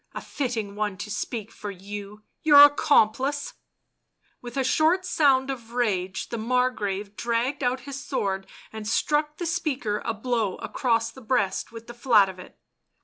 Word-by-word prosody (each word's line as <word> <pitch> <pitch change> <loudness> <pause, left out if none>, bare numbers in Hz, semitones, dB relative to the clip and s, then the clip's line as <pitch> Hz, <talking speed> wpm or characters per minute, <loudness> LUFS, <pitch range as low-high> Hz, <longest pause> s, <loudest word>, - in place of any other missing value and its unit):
" - - -34
A - - -3
fitting 230 -7 -3
one 205 -2 -2
to 210 +1 -6
speak 215 +1 -4
for 210 - -7
you 205 +2 -8
— - - -53
your 290 -2 +9
accomplice 285 -1 +3 0.5
!" - - -43
With 240 +1 -8
a 270 - +2
short 330 +7 +2
sound 275 -6 +3
of 235 -3 -8
rage 190 -7 -1
the 235 - -4
Margrave 215 -4 -1
dragged 240 +5 -1
out 255 0 0
his 275 +1 -7
sword 195 -9 -2 0.3
and 220 -1 -6
struck 300 +6 0
the 350 - -4
speaker 295 - -1
a 230 - -2
blow 225 -3 -1
across 230 -3 -1
the 265 - -13
breast 220 -5 0
with 230 0 -10
the 240 - -9
flat 230 -5 +4
of 185 -1 -10
it. 180 - -13
235 Hz, 175 wpm, -25 LUFS, 210-270 Hz, 0.5 s, your